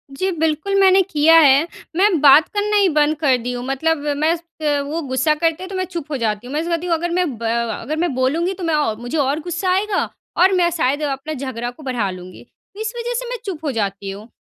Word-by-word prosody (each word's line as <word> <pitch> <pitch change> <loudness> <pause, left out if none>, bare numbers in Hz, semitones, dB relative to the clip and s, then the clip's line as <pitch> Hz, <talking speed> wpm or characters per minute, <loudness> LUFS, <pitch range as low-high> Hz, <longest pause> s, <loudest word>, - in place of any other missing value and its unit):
जी 375 +7 -1
बिल्कुल, 320 +3 -1
मैंने 385 0 +6
किया 325 -3 +4
है। 285 +1 +5 0.3
मैं 375 -1 +3
बात 295 +2 +7
करना 420 0 -1
ही 400 -2 +4
बंद 300 -1 +2
कर 280 -5 +3
दी 245 +1 -4
हूँ 245 0 -5
मतलब 320 +5 0 0.2
मैं 315 +3 +2
स - - -9 0.5
वो 315 +4 -3
गुस्सा 260 +4 +1
करते 330 +2 -1
हैं - - -6
तो 390 - -6
मैं 370 - -1
चुप 340 -4 -6
हो 285 - -1
जाती 220 -1 -2
हूँ। 260 - -7
मैं 300 - 0
उससे 335 - -4
कहती 335 +1 -1
हूँ 340 - +1
अगर 345 +2 -2
मैं 360 +1 +2
ब 230 - -9 0.4
अगर 305 - -3
मैं 345 -4 0
बोलूँगी 310 +9 0
तो 380 - -8
मैं 330 -2 +1
औ 290 -8 0
मुझे 245 +6 -4
और 285 +1 +1
गुस्सा 350 +3 -3
आएगा 390 +2 0 0.3
और 375 +2 +5
मैं 355 -2 +3
शायद 285 0 0
अपना 285 +2 -3
झगड़ा 255 -4 -4
को 275 +5 -15
बढ़ा 245 -7 -1
लूँगी। 185 +3 -11 0.4
इस 440 +1 -3
वजह 480 +1 -3
से - - -6
मैं - - -3
चुप 350 -6 -5
हो 290 - 0
जाती 200 -4 -3
हूँ। 205 +3 -10
310 Hz, 245 wpm, -19 LUFS, 265-360 Hz, 0.5 s, बात